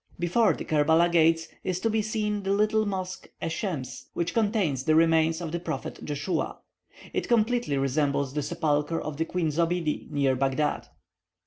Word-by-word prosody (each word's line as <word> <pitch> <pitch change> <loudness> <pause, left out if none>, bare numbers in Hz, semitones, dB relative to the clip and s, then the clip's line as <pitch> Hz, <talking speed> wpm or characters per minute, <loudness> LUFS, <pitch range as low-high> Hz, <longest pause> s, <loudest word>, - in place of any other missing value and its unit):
Before 180 +6 +3
the - - -6
Kerbela 160 +3 +3
gates 165 -1 +3 0.2
is 185 -1 -1
to - - +1
be 220 0 +1
seen 210 -1 -1
the 195 0 0
little 215 +1 +2
mosque 185 -2 -4
Esshems, 165 - -4
which 170 0 -1
contains 205 - +1
the 155 - +4
remains 165 0 +3
of 165 -3 -4
the 170 - -2
prophet 165 -2 -5
Joshua. 145 +5 -2 0.6
It - - -1
completely 235 - +2
resembles 140 0 0
the 150 - -1
sepulchre 150 +2 0
of 155 -2 -5
the 160 - 0
Queen 170 -2 -1
Zobiede 165 0 -1
near 140 -3 +1
Baghdad. 135 +3 0
165 Hz, 160 wpm, -27 LUFS, 150-195 Hz, 0.6 s, the